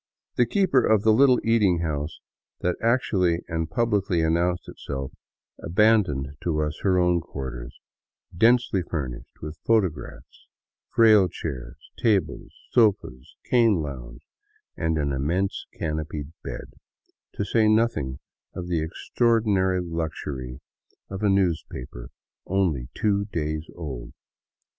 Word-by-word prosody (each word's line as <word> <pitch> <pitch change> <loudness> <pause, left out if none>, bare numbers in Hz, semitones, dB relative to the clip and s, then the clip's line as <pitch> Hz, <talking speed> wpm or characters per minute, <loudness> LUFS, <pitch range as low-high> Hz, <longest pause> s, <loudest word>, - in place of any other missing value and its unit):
The 120 - +3
keeper 170 - +3
of 110 -2 +3
the 110 - +5
little 130 +1 +5
eating 105 -7 +3
house 75 -1 -3 0.4
that 90 0 0
actually 95 -8 +1
and 80 0 -2
publicly 100 -4 +1
announced 85 +2 +1
itself, 70 -1 -6 0.5
abandoned 85 -8 +2
to 75 -3 0
us 75 +1 -4
her 95 -2 +2
own 90 -1 +3
quarters, 65 -6 -7 0.6
densely 115 0 +3
furnished 70 -9 -6
with 75 +1 -7
photographs, 105 -8 -1 0.4
frail 110 -4 +6
chairs, 65 -7 -6 0.2
tables, 105 -5 0 0.2
sofas, 100 - +1
cane 115 -4 +4
lounge, - - -8 0.5
and 80 -2 0
an 70 -2 0
immense 85 +9 -1
canopied 75 -1 -4
bed, - - -7 0.6
to 100 - -2
say 110 +2 +3
nothing 110 - +1 0.4
of 90 - -5
the 85 -3 +1
extraor 115 +8 +1
dinary 95 -4 +1
luxury 75 -6 -5 0.5
of 95 +1 -5
a 105 - +2
newspaper 80 -10 -1 0.4
only 85 -10 0
two 100 -2 +1
days 80 -4 -3
old. 70 -8 -7
85 Hz, 120 wpm, -25 LUFS, 75-105 Hz, 0.6 s, frail